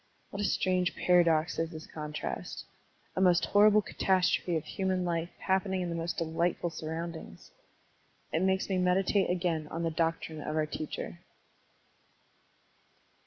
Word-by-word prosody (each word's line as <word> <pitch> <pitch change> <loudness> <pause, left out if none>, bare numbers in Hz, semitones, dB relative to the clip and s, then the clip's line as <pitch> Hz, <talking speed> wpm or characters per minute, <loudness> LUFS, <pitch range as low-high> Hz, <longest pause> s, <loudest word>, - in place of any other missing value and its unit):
What 200 - -4
a - - +1
strange 185 -2 +1
paradox 170 -2 +3
is 165 0 0
this 160 -2 -8
contrast, 150 -1 -5 0.3
— - - -37
a 185 - 0
most 180 -2 +4
horrible 210 +1 +5
catastrophe 185 -3 +1
of 155 - -5
human 185 -1 -1
life 170 -1 -1
happening 190 0 0
in 175 - -2
the 170 - -3
most 165 +1 -3
delightful 170 +1 0
surroundings! 160 - -6 0.8
It 160 - +2
makes 190 0 +2
me 190 -2 0
meditate 185 +2 +2
again 175 -4 0
on 165 +2 -4
the 165 - 0
doctrine 160 -1 -1
of 155 - -3
our 155 -1 +2
teacher. 145 - -5
170 Hz, 145 wpm, -30 LUFS, 160-185 Hz, 0.8 s, horrible